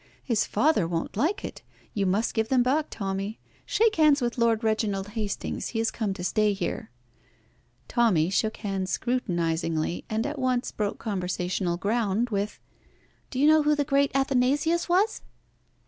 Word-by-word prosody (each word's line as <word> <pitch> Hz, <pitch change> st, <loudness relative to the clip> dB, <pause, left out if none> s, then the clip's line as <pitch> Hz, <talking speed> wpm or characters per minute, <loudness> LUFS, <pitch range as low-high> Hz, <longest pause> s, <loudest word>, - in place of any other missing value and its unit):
His 225 Hz, -4 st, +1 dB
father 290 Hz, -, +2 dB
won't 165 Hz, -1 st, -3 dB
like 325 Hz, -, 0 dB
it. -, -, -8 dB, 0.3 s
You 200 Hz, -2 st, 0 dB
must 200 Hz, +5 st, +1 dB
give 220 Hz, 0 st, 0 dB
them 255 Hz, -2 st, +4 dB
back, 290 Hz, +5 st, +1 dB
Tommy. 195 Hz, +1 st, -3 dB, 0.3 s
Shake 445 Hz, -3 st, +2 dB
hands 305 Hz, -2 st, +5 dB
with 240 Hz, -1 st, -2 dB
Lord 230 Hz, -1 st, +2 dB
Reginald 210 Hz, -3 st, 0 dB
Hastings. 210 Hz, -1 st, -3 dB
He 230 Hz, -, -5 dB
has 225 Hz, 0 st, +1 dB
come 215 Hz, -4 st, -2 dB
to 180 Hz, -, -6 dB
stay 210 Hz, +2 st, +2 dB
here." 195 Hz, -, -4 dB, 1.0 s
Tommy 190 Hz, -9 st, +2 dB
shook 220 Hz, +2 st, 0 dB
hands 195 Hz, -3 st, -3 dB
scrutinisingly, 170 Hz, -9 st, -1 dB
and 220 Hz, +1 st, -1 dB
at 290 Hz, 0 st, -4 dB
once 255 Hz, -1 st, 0 dB
broke 205 Hz, -2 st, -2 dB
conversational 180 Hz, -3 st, -2 dB
ground 220 Hz, +3 st, 0 dB
with 205 Hz, 0 st, -2 dB, 0.7 s
"Do 255 Hz, -, -6 dB
you 285 Hz, -, +4 dB
know 310 Hz, 0 st, +6 dB
who 300 Hz, 0 st, +3 dB
the 290 Hz, -, +1 dB
great 275 Hz, +1 st, +3 dB
Athanasius 275 Hz, +6 st, +2 dB
was?" 390 Hz, +5 st, +2 dB
220 Hz, 160 wpm, -26 LUFS, 195-265 Hz, 1.0 s, know